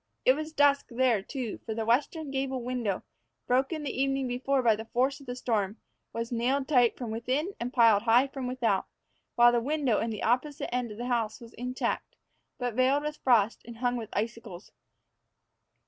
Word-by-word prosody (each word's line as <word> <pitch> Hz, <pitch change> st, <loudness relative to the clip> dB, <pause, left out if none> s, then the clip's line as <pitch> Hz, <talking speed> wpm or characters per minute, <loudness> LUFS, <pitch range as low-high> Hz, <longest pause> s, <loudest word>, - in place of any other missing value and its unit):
It 255 Hz, -, +7 dB
was 310 Hz, +3 st, -5 dB
dusk 285 Hz, -2 st, +3 dB
there, 240 Hz, -3 st, +2 dB
too, 245 Hz, +1 st, -5 dB
for 220 Hz, -, -4 dB
the 225 Hz, 0 st, -2 dB
western 280 Hz, +5 st, 0 dB
gable 265 Hz, -2 st, -2 dB
window, 235 Hz, -6 st, -2 dB, 0.4 s
broken 270 Hz, +5 st, +1 dB
the 270 Hz, -2 st, -2 dB
evening 270 Hz, -1 st, 0 dB
before 260 Hz, +2 st, 0 dB
by 225 Hz, -2 st, +5 dB
the 220 Hz, +1 st, -7 dB
force 260 Hz, +5 st, 0 dB
of 275 Hz, -, -15 dB
the 245 Hz, -, -4 dB
storm, 215 Hz, -4 st, -1 dB, 0.3 s
was 230 Hz, +1 st, -4 dB
nailed 260 Hz, +3 st, 0 dB
tight 245 Hz, -6 st, +3 dB
from 240 Hz, -3 st, -5 dB
within 260 Hz, -, -1 dB
and 240 Hz, +1 st, -3 dB
piled 230 Hz, -5 st, +5 dB
high 235 Hz, +3 st, +5 dB
from 270 Hz, -2 st, -5 dB
without; 240 Hz, -6 st, 0 dB, 0.5 s
while 240 Hz, 0 st, +7 dB
the 240 Hz, -1 st, +1 dB
window 275 Hz, -3 st, +1 dB
in 230 Hz, -, -1 dB
the 215 Hz, -2 st, -5 dB
opposite 250 Hz, +4 st, 0 dB
end 245 Hz, -2 st, -1 dB
of 210 Hz, -, -9 dB
the 240 Hz, -, -4 dB
house 230 Hz, -3 st, -1 dB
was 230 Hz, -1 st, -13 dB
intact, 250 Hz, +2 st, -3 dB, 0.4 s
but 245 Hz, -2 st, -2 dB
veiled 260 Hz, +4 st, +2 dB
with 300 Hz, 0 st, -4 dB
frost 230 Hz, -4 st, +3 dB
and 235 Hz, 0 st, -10 dB
hung 245 Hz, +1 st, 0 dB
with 230 Hz, -3 st, -5 dB
icicles. 220 Hz, -4 st, -5 dB
245 Hz, 190 wpm, -29 LUFS, 230-270 Hz, 0.5 s, It